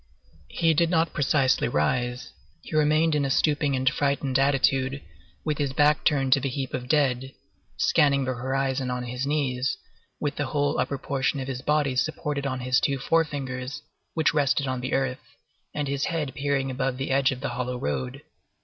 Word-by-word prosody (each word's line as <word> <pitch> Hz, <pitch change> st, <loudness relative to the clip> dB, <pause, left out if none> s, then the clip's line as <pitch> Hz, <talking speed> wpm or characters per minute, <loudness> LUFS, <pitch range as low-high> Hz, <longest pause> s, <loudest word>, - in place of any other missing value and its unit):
He 165 Hz, -, +2 dB
did 165 Hz, +2 st, +2 dB
not 165 Hz, -1 st, +1 dB
precisely 140 Hz, -2 st, +2 dB
rise; 125 Hz, -, -1 dB, 0.3 s
he -, -, -6 dB
remained 155 Hz, +1 st, +3 dB
in 150 Hz, -1 st, +1 dB
a 135 Hz, -, 0 dB
stooping 145 Hz, 0 st, +2 dB
and 130 Hz, 0 st, -2 dB
frightened 140 Hz, -1 st, +1 dB
attitude, 135 Hz, -1 st, +2 dB, 0.5 s
with 150 Hz, -2 st, -1 dB
his 140 Hz, -2 st, -1 dB
back 150 Hz, +1 st, +3 dB
turned 135 Hz, -4 st, +3 dB
to 135 Hz, -, +4 dB
the 135 Hz, +1 st, -2 dB
heap 130 Hz, 0 st, -4 dB
of 125 Hz, -1 st, -4 dB
dead, 135 Hz, -3 st, +1 dB, 0.4 s
scanning 140 Hz, -2 st, +3 dB
the 130 Hz, -, -1 dB
horizon 130 Hz, +1 st, -1 dB
on 125 Hz, 0 st, -2 dB
his 125 Hz, +2 st, -3 dB
knees, 135 Hz, -3 st, 0 dB, 0.4 s
with 145 Hz, -1 st, -2 dB
the 145 Hz, -, -1 dB
whole 145 Hz, +1 st, 0 dB
upper 135 Hz, +2 st, -1 dB
portion 135 Hz, +1 st, -1 dB
of 130 Hz, -, -4 dB
his 130 Hz, -2 st, -4 dB
body 150 Hz, -3 st, +1 dB
supported 145 Hz, +1 st, -1 dB
on 130 Hz, -1 st, -3 dB
his 125 Hz, +1 st, +2 dB
two 140 Hz, -1 st, 0 dB
forefingers, 140 Hz, -2 st, -1 dB, 0.3 s
which 160 Hz, -3 st, +2 dB
rested 140 Hz, -2 st, +2 dB
on 130 Hz, -1 st, -2 dB
the 130 Hz, -, -3 dB
earth, 130 Hz, -1 st, 0 dB, 0.5 s
and 145 Hz, -1 st, -3 dB
his 140 Hz, +1 st, -1 dB
head 150 Hz, -6 st, -2 dB
peering 140 Hz, -1 st, -1 dB
above 135 Hz, 0 st, -2 dB
the 135 Hz, 0 st, -3 dB
edge 135 Hz, 0 st, +3 dB
of 130 Hz, -1 st, -6 dB
the -, -, -2 dB
hollow 125 Hz, +1 st, -3 dB
road. 70 Hz, -, -3 dB
135 Hz, 185 wpm, -26 LUFS, 130-145 Hz, 0.5 s, to